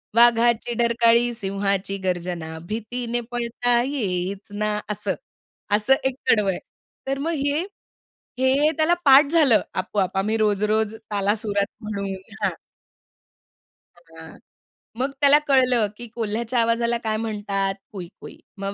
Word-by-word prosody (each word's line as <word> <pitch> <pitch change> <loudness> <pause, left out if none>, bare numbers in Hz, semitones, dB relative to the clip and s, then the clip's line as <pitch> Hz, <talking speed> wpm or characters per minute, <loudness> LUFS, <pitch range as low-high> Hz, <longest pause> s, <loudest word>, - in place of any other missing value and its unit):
वाघाची 235 0 +4
डरकाळी, 235 0 +3
सिंहाची 195 -2 -2
गर्जना 175 -3 -3
भीतीने 235 +2 -3
पळता 240 0 +1
येईच 200 -7 -3
ना." 210 0 -1
असं, 210 - -2 0.6
असं 215 +6 +3
एक 265 -1 +1
कडव 210 -3 +4
आहे. 185 - -1 0.5
तर 270 0 -1
मग 335 - -1
हे, 290 +2 +1 0.8
हे 270 +4 +3
त्याला 315 +2 +3
पाठ 275 +1 +8
झालं 290 -10 +5
आपोआप. 190 0 -1
आम्ही 215 +3 +1
रोज-रोज 215 +1 +1 0.2
तालासुरात 205 0 0 0.2
म्हणून 200 -2 -4 0.3
हां. - - +1 1.4
हां, 165 -1 -14 0.6
मग 265 +2 0
त्याला 285 +1 +6
कळलं 255 -5 +4
की 240 - -8
कोल्ह्याच्या 230 +2 -1
आवाजाला 235 +1 +1
काय 215 -1 -1
म्हणतात 205 -3 -2 0.2
कुई-कुई. 185 -3 -10 0.2
मग 195 0 -4
220 Hz, 120 wpm, -23 LUFS, 200-240 Hz, 1.4 s, पाठ